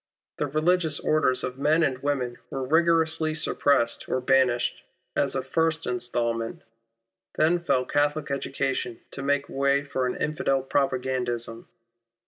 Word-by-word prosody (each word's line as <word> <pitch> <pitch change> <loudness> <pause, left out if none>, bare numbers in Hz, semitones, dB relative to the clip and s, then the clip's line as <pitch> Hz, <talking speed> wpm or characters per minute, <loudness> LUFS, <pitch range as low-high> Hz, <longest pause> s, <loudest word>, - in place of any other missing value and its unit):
The 145 - 0
religious 155 +1 +1
orders 150 -5 +1
of 130 +1 -4
men 155 +3 +3
and 130 -4 0
women 130 -4 -2
were 135 -1 -3
rigorously 160 +1 +2
suppressed 140 -6 +1
or 130 - +1
banished, 125 -2 +2 0.3
as 140 -1 +1
a 130 - -1
first 160 +4 0
instalment. 120 -2 -2 0.7
Then 165 +3 +3
fell 140 -7 +1
Catholic 145 +1 0
education 135 -3 -2
to 140 - -7
make 145 +1 0
way 140 +1 +1
for 130 -2 -1
an 125 - -2
Infidel 150 -4 0
propagandism. 125 -4 -1
140 Hz, 130 wpm, -26 LUFS, 125-155 Hz, 0.7 s, men